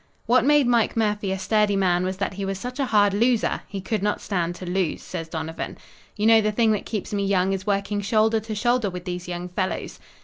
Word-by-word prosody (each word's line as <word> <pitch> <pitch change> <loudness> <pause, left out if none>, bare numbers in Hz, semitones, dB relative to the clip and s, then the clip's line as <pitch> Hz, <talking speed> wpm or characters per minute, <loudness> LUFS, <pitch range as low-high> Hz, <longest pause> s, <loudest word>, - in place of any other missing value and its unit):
"What 240 +1 +4
made 295 -1 +5
Mike 235 -2 +2
Murphy 210 -3 0
a 190 - -1
sturdy 205 +2 +2
man, 180 -2 +2
was 185 0 -2
that 200 0 -2
he 195 +1 -5
was 195 0 -2
such 250 +7 -6
a 275 - +1
hard 205 -3 +3
loser 230 +2 +1
he 200 - -5
could 210 +2 -2
not 210 +1 0
stand 175 -3 -2
to 185 - -8
lose," 180 -2 -1
says 165 -3 -6
Donovan. 160 0 -5 0.4
"You 210 - -1
know 225 0 +7
the 215 0 +1
thing 225 +1 +2
that 210 - -2
keeps 210 -2 -4
me 200 -1 0
young 195 -1 +2
is 190 +1 -5
working 200 0 0
shoulder 220 +2 +2
to 220 0 -6
shoulder 240 0 +1
with 180 -1 -7
these 180 -1 -5
young 175 0 -4
fellows." 185 +1 -3
200 Hz, 235 wpm, -24 LUFS, 185-220 Hz, 0.4 s, know